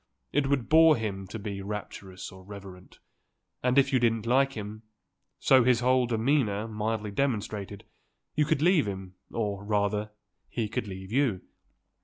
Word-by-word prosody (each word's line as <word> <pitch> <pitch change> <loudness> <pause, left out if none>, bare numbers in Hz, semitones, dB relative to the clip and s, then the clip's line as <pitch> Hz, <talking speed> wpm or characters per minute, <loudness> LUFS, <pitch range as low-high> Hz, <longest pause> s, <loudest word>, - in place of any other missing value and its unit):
It 145 -1 +2
would 135 -4 0
bore 160 0 +7
him 100 -4 -4
to 95 - -6
be 100 -2 -5
rapturous 100 -2 -7
or 95 0 -13
reverent, 95 -2 -11 0.6
and 125 +1 +1
if 140 0 +4
you 130 - +5
didn't 115 -2 +1
like 135 +3 +3
him, 105 -1 -7 0.6
so 130 -2 +5
his 125 -1 +3
whole 125 0 +3
demeanour 115 -3 +1
mildly 110 -1 -2
demonstrated, 105 -5 -2 0.5
you 150 - +2
could 155 -1 +1
leave 175 - +4
him, 95 -2 -6 0.2
or, 100 -3 -2
rather, 105 0 0 0.4
he 115 -3 -2
could 115 +1 -3
leave 95 0 -8
you. 125 -7 +1
110 Hz, 155 wpm, -28 LUFS, 100-130 Hz, 0.6 s, bore